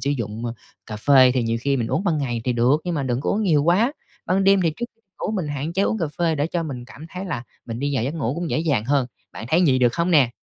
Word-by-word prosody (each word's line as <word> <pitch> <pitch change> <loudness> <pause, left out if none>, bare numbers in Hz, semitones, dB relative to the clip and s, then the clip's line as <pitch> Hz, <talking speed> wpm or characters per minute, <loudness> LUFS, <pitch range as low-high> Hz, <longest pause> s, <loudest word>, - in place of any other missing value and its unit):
sử 140 +3 -1
dụng, 115 -4 -3
ơ, 115 - -3 0.3
cà 110 - -6
phê, 130 +3 +6
thì 125 - +2
nhiều 115 0 0
khi 140 +2 +1
mình 115 -3 -1
uống 195 - -1
ban 170 -5 +1
ngày 120 -5 -2
thì 125 - +1
được, 125 +5 +3
nhưng 175 -1 -2
mà 145 - -1
đừng 125 -2 -1
có - - -1
uống 215 - 0
nhiều 155 -8 +3
quá. 195 - +3 0.3
Ban 190 +1 +2
đêm 195 0 +5
thì 165 - +1
trước 240 - -3 0.4
ngủ, - - -1
mình 185 -8 -2
hạn 145 +3 -3
chế 190 +3 +1
uống 220 - 0
cà 170 - 0
phê 170 -2 +2
để 145 0 0
cho 170 0 -2
mình 130 -6 -6
cảm 150 +5 -12
thấy 185 +3 -6
là 155 -10 -3 0.2
mình 115 -1 -5
đi 140 +2 -1
vào 120 -4 0
giấc 140 +5 -2
ngủ 135 -6 -1
cũng 170 -1 -3
dễ - - +1
dàng 145 -9 +1
hơn. 135 0 +1 0.3
Bạn - - -7
thấy 170 +6 +3
vậy 130 -3 +3
được 120 -2 +3
không 170 +4 0
nè? 140 -8 +5
145 Hz, 305 wpm, -22 LUFS, 125-170 Hz, 0.4 s, phê